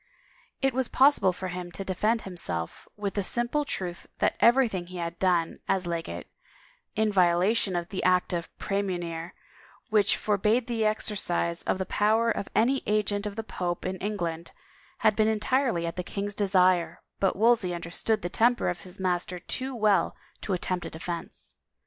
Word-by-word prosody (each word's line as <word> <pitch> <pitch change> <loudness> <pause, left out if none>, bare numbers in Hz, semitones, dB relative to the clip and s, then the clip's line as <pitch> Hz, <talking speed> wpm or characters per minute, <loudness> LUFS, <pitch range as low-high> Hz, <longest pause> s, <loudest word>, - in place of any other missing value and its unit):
It 270 -1 +3
was 260 -1 0
possible 270 -8 +4
for 185 +1 -5
him 180 0 -6
to 195 - -6
defend 215 +5 0
himself 165 - -5
with 205 -1 -3
the 205 - 0
simple 240 +8 +1
truth 180 -10 -4
that - - +1
everything 230 -8 +4
he 185 0 -8
had 170 0 -4
done, 175 -3 +1
as 190 -1 +1
legate, 170 -1 -4 0.7
in 215 0 +2
violation 185 +2 +3
of 175 0 -2
the 190 - -3
Act 180 0 +2
of 170 -1 -2
Praemunire 175 -4 -3 0.6
which 210 -2 +4
forbade 215 +3 +1
the 230 -3 -1
exercise 190 -5 0
of - - +1
the 190 - -2
power 220 +4 +2
of 200 - -3
any 265 +4 +3
agent 210 0 0
of 200 - -6
the 225 - -3
pope 175 -5 -3
in 185 +1 -2
Eng 210 +1 -2
land, 170 -2 -4 0.5
had 215 -1 +5
been 215 0 +3
entirely 220 -3 +1
at 165 - -4
the 180 - -2
king's 200 +3 -4
desire, 185 -3 +2 0.2
but 195 - +2
Wolsey 220 -3 +3
understood 175 +5 0
the - - 0
temper 235 +6 +2
of 175 - -3
his 185 +1 -10
master 180 -1 -1
too 260 +8 -4
well 210 -3 +2 0.3
to 200 - -2
attempt 180 -1 -2
a - - -6
defense. 170 +1 -6
195 Hz, 175 wpm, -27 LUFS, 175-220 Hz, 0.7 s, had